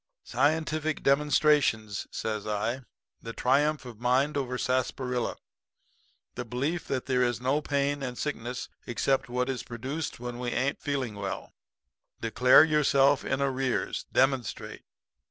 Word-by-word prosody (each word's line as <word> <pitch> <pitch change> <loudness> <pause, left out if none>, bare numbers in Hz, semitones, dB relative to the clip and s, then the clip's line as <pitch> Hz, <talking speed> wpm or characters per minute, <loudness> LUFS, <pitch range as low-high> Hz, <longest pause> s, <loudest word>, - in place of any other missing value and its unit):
"'Scientific 155 +3 0
demonstrations,' 140 -7 +2
says 110 -2 -3
I. 110 +5 -1 0.4
'The 115 - -7
triumph 140 +5 +2
of 120 -3 -10
mind 130 +5 +2
over 125 -3 -2
sarsaparilla. 125 -1 -1 1.0
The 125 - -4
belief 140 +8 -2
that 130 -2 -2
there 130 -2 +1
is 120 -2 +1
no 135 +4 +1
pain 140 0 0
and 125 -2 -4
sickness 125 -4 -4 0.2
except 130 +1 0
what 125 +1 0
is 130 -3 -2
produced 130 +7 -5
when 120 0 -6
we 125 -1 -2
ain't 130 +3 -1
feeling 135 -6 -2
well. 100 -1 -5 0.7
Declare 125 +4 +6
yourself 145 -3 +3
in 140 - 0
arrears. 135 -2 -1
Demonstrate.' 130 -2 0
130 Hz, 130 wpm, -28 LUFS, 120-140 Hz, 1.0 s, Declare